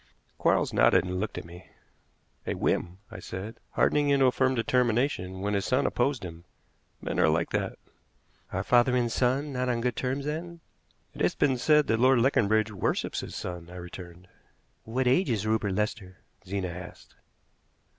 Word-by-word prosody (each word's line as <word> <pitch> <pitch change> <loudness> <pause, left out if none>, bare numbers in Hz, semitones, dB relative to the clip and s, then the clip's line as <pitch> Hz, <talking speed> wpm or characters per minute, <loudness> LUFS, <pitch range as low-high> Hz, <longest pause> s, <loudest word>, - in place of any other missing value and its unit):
Quarles - - +2
nodded - - +5
and 90 0 -3
looked 105 +1 -3
at - - -6
me. 85 +2 -13 0.8
"A - - -1
whim," 85 +1 -1
I 110 - -8
said; 100 +5 -7
"hardening 145 -1 +2
into 140 -1 +4
a 130 - +5
firm 130 +1 +1
determination 115 -6 0
when 105 +1 -1
his 100 -1 0
son 130 +6 +1
opposed 120 -4 0
him. 85 -1 -9 0.6
Men - - -2
are - - +5
like 85 +2 0
that." - - -2 0.7
"Are - - -2
father 125 +1 +4
and 120 -2 +1
son 135 +5 0
not 125 0 -1
on 120 -1 0
good 125 +1 -1
terms, 135 +2 -2
then?" 165 +3 -5 0.5
"It - - -8
has - - +2
been 135 - +2
said 150 +3 +4
that 115 -3 +1
Lord 130 +1 +5
Leconbridge 110 -3 +2
worships 100 - -1
his - - -7
son," 85 -1 -6
I 90 - -11
returned. 90 0 -10 0.6
"What 125 +4 -1
age 135 +9 +3
is 110 -4 0
Rupert 110 -2 0
Lester?" 100 -2 -3 0.3
Zena 95 -1 -2
asked. 90 +1 -10
115 Hz, 175 wpm, -28 LUFS, 95-130 Hz, 0.8 s, nodded